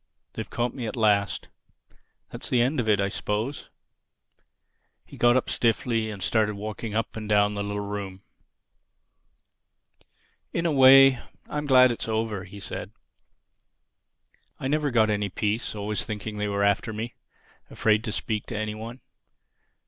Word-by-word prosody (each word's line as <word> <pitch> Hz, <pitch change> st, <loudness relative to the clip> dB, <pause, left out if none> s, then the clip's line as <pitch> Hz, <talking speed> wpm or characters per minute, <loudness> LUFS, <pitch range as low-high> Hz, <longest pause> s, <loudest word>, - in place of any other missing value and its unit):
They've -, -, -6 dB
caught 120 Hz, 0 st, -2 dB
me 125 Hz, -4 st, -5 dB
at -, -, -5 dB
last. 105 Hz, -3 st, +1 dB, 0.8 s
That's -, -, -5 dB
the 125 Hz, -, +2 dB
end 130 Hz, +4 st, +2 dB
of 110 Hz, -3 st, 0 dB
it, 105 Hz, -2 st, +4 dB
I 100 Hz, -, +1 dB
suppose." 105 Hz, +6 st, -3 dB, 1.4 s
He -, -, -13 dB
got 120 Hz, +1 st, +4 dB
up 130 Hz, -, -1 dB
stiffly 115 Hz, -1 st, 0 dB
and 100 Hz, -3 st, -6 dB
started 110 Hz, -1 st, +1 dB
walking 105 Hz, +1 st, -5 dB
up 115 Hz, -, -2 dB
and 110 Hz, -1 st, -6 dB
down 105 Hz, 0 st, +3 dB
the 100 Hz, -, -3 dB
little 105 Hz, 0 st, -3 dB
room. 100 Hz, -2 st, -6 dB, 2.3 s
"In 170 Hz, -, -1 dB
a 165 Hz, -, +2 dB
way 135 Hz, -1 st, +7 dB, 0.3 s
I'm 150 Hz, 0 st, -4 dB
glad 130 Hz, -2 st, +6 dB
it's 115 Hz, -, -4 dB
over," 110 Hz, -3 st, -2 dB
said -, -, -6 dB
he. -, -, -43 dB
"I 130 Hz, -, -3 dB
never 150 Hz, +1 st, +1 dB
got 110 Hz, -4 st, +3 dB
any 105 Hz, -1 st, -1 dB
peace, 105 Hz, +4 st, -2 dB
always 105 Hz, 0 st, -1 dB
thinking 105 Hz, 0 st, -5 dB
they 105 Hz, 0 st, -1 dB
were 100 Hz, 0 st, 0 dB
after 100 Hz, +3 st, +1 dB
me—afraid 110 Hz, -1 st, -3 dB
to 110 Hz, -, -2 dB
speak 110 Hz, 0 st, -3 dB
to -, -, -4 dB
anyone. 110 Hz, +3 st, -5 dB
110 Hz, 150 wpm, -26 LUFS, 105-120 Hz, 2.3 s, way